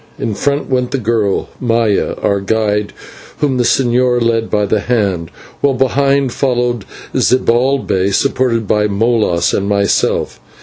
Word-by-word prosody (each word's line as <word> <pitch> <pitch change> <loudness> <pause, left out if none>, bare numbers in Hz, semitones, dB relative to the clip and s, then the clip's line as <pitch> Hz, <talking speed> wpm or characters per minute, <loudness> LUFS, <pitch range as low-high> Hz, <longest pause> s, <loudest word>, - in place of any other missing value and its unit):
In 110 - -3
front 145 +7 -1
went 125 -2 0
the 135 - -2
girl, 110 -4 -1
Maya, 115 -4 0
our 100 0 +1
guide, 105 0 0 0.5
whom 140 -4 0
the 125 - +2
señor 125 0 +2
led 115 -1 0
by 105 -1 +1
the 105 +2 0
hand, 100 -8 -1 0.3
while 140 -2 +1
behind 135 +1 +1
followed 120 -5 -1 0.3
Zibalbay 120 -6 +1
supported 115 0 0
by 105 +1 +2
Molas 105 -4 +1
and 100 0 -1
myself. 100 0 0
115 Hz, 135 wpm, -15 LUFS, 105-130 Hz, 0.5 s, the